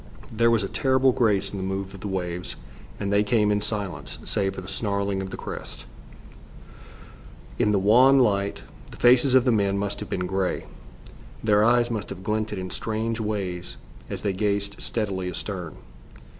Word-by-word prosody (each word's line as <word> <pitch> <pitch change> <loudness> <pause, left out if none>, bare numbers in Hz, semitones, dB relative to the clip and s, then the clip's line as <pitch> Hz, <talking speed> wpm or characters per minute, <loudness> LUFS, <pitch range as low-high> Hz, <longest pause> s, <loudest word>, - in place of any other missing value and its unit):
There 115 +1 +3
was 115 -3 +3
a - - -1
terrible 130 +3 +3
grace 105 -5 +2
in 100 - -5
the 95 - -3
move 95 +1 -3
of 100 - -10
the 105 - -5
waves, 90 -2 -3 0.4
and 100 0 -1
they 100 +1 +4
came 105 0 +2
in 105 0 +1
silence, 100 -9 -3
save 95 -1 0
for - - -5
the 90 - -10
snarling 100 -1 -1
of 95 - -5
the - - -7
crests. - - -7 1.7
In 105 - +3
the 105 - +3
wan 125 +8 +6
light, 100 -6 +1 0.3
the - - -12
faces 125 +2 +5
of 130 -1 +5
the 125 - +4
men 100 -3 +2
must 100 0 -2
have 105 - -6
been 90 - -2
grey. 95 0 -1 0.8
Their 105 -1 +4
eyes 120 +1 +3
must 110 -3 -3
have 95 -1 -7
glinted 110 0 -1
in 95 0 -5
strange 110 +1 -2
ways 100 -5 -3 0.3
as - - -5
they 100 - 0
gazed 100 0 -1
steadily 95 -5 -2
astern. 90 -3 -5
100 Hz, 180 wpm, -25 LUFS, 95-110 Hz, 1.7 s, wan